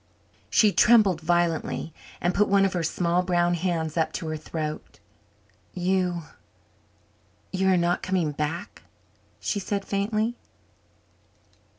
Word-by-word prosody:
She 210 Hz, -2 st, +4 dB
trembled 205 Hz, -6 st, +5 dB
violently 165 Hz, -1 st, 0 dB, 0.3 s
and 175 Hz, +1 st, 0 dB
put 210 Hz, +1 st, +3 dB
one 195 Hz, 0 st, +4 dB
of 195 Hz, -, 0 dB
her 175 Hz, -, -1 dB
small 170 Hz, +2 st, +1 dB
brown 175 Hz, -1 st, +1 dB
hands 170 Hz, -2 st, -2 dB
up 160 Hz, -1 st, +1 dB
to 165 Hz, -, -4 dB
her 155 Hz, -, -2 dB
throat. 155 Hz, 0 st, -6 dB, 0.8 s
"You 180 Hz, -1 st, 0 dB, 1.3 s
you 190 Hz, 0 st, +1 dB
are 190 Hz, -1 st, +4 dB
not 175 Hz, 0 st, +1 dB
coming 180 Hz, -5 st, 0 dB
back?" 150 Hz, +4 st, -4 dB, 0.6 s
she 205 Hz, -, -2 dB
said 200 Hz, 0 st, -3 dB
faintly. 215 Hz, +4 st, -1 dB
175 Hz, 120 wpm, -25 LUFS, 165-195 Hz, 1.3 s, trembled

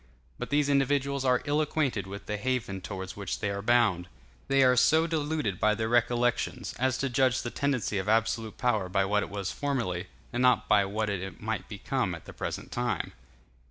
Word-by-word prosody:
But 125 Hz, -, -4 dB
these 145 Hz, 0 st, +2 dB
individuals 140 Hz, -1 st, +1 dB
are 125 Hz, -2 st, +2 dB
ill 145 Hz, +1 st, +2 dB
acquainted 140 Hz, -, -1 dB
with 100 Hz, +1 st, -8 dB
the 105 Hz, -, -3 dB
haven 110 Hz, -5 st, -2 dB
towards 95 Hz, -1 st, -6 dB
which 100 Hz, -3 st, -4 dB
they 105 Hz, -, -1 dB
are 100 Hz, 0 st, -3 dB
bound. 105 Hz, -6 st, +3 dB, 0.4 s
They 135 Hz, 0 st, +4 dB
are 125 Hz, -1 st, +5 dB
so 140 Hz, +7 st, +4 dB
deluded 150 Hz, -, -1 dB
by 105 Hz, 0 st, +3 dB
their 110 Hz, +1 st, -1 dB
recollections, 120 Hz, 0 st, +1 dB
as 130 Hz, 0 st, +1 dB
to 135 Hz, -, -1 dB
judge 130 Hz, 0 st, +2 dB
the 120 Hz, -, -4 dB
tendency 130 Hz, -7 st, 0 dB
of 95 Hz, +2 st, -3 dB
absolute 115 Hz, 0 st, +1 dB
power 110 Hz, -7 st, +1 dB
by 95 Hz, +1 st, +2 dB
what 105 Hz, +1 st, +2 dB
it -, -, -4 dB
was 100 Hz, -2 st, -3 dB
formerly, 115 Hz, -11 st, -2 dB, 0.3 s
and 120 Hz, -, 0 dB
not 125 Hz, -2 st, +4 dB
by 100 Hz, -2 st, +4 dB
what 105 Hz, +2 st, -1 dB
it 95 Hz, -1 st, -5 dB
might -, -, -3 dB
become -, -, -2 dB
at -, -, -12 dB
the -, -, -10 dB
present -, -, -5 dB
time. 120 Hz, -6 st, -2 dB
120 Hz, 195 wpm, -29 LUFS, 100-130 Hz, 0.4 s, are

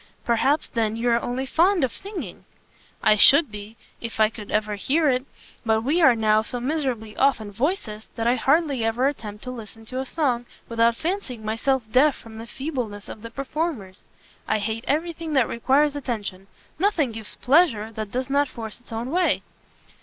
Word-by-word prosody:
"Perhaps, 265 Hz, +6 st, +2 dB
then, 220 Hz, -2 st, 0 dB
you 235 Hz, +2 st, 0 dB
are 235 Hz, 0 st, +3 dB
only 255 Hz, +2 st, -2 dB
fond 345 Hz, +5 st, +3 dB
of 255 Hz, -, 0 dB
singing?" 400 Hz, -1 st, -6 dB, 0.6 s
"I 215 Hz, -, +6 dB
should 285 Hz, +4 st, +7 dB
be, 210 Hz, +2 st, -9 dB, 0.2 s
if 230 Hz, -1 st, -6 dB
I 215 Hz, 0 st, +5 dB
could 215 Hz, -2 st, -10 dB, 0.3 s
hear 305 Hz, +8 st, +2 dB
it; 255 Hz, 0 st, +1 dB, 0.4 s
but 220 Hz, -1 st, +2 dB
we 305 Hz, +8 st, +2 dB
are 265 Hz, -7 st, +7 dB
now 215 Hz, -1 st, +3 dB
so 245 Hz, +2 st, -4 dB
miserably 250 Hz, -6 st, -2 dB
off 275 Hz, -2 st, +3 dB
in 210 Hz, -2 st, -7 dB
voices, 225 Hz, -, -2 dB
that 225 Hz, -, -2 dB
I 240 Hz, -, +4 dB
hardly 275 Hz, 0 st, +2 dB
ever 230 Hz, +4 st, +2 dB
attempt 215 Hz, -7 st, -5 dB
to 250 Hz, -, -5 dB
listen 225 Hz, -2 st, -10 dB
to 255 Hz, +3 st, -5 dB
a 265 Hz, -, -2 dB
song, 250 Hz, -7 st, 0 dB, 0.2 s
without 230 Hz, 0 st, +2 dB
fancying 295 Hz, -, -4 dB
myself 240 Hz, +4 st, 0 dB
deaf 275 Hz, +4 st, +5 dB
from 220 Hz, -1 st, -11 dB
the 230 Hz, -, -8 dB
feebleness 245 Hz, -8 st, -5 dB
of 215 Hz, -, -8 dB
the 230 Hz, -, -7 dB
performers. 270 Hz, -, -4 dB, 0.5 s
I -, -, +2 dB
hate 220 Hz, +3 st, -3 dB
every 330 Hz, +4 st, 0 dB
thing 325 Hz, -1 st, -6 dB
that 265 Hz, -5 st, +4 dB
requires 280 Hz, +5 st, +2 dB
attention. 210 Hz, -8 st, -4 dB, 0.3 s
Nothing 340 Hz, -, +2 dB
gives 220 Hz, -1 st, -7 dB
pleasure 250 Hz, -7 st, +3 dB
that 215 Hz, -1 st, -5 dB
does 255 Hz, +1 st, -2 dB
not 280 Hz, +1 st, +2 dB
force 225 Hz, -3 st, -7 dB
its 245 Hz, -, -21 dB
own 230 Hz, +3 st, -4 dB
way." 360 Hz, +1 st, +2 dB
245 Hz, 185 wpm, -24 LUFS, 220-285 Hz, 0.6 s, should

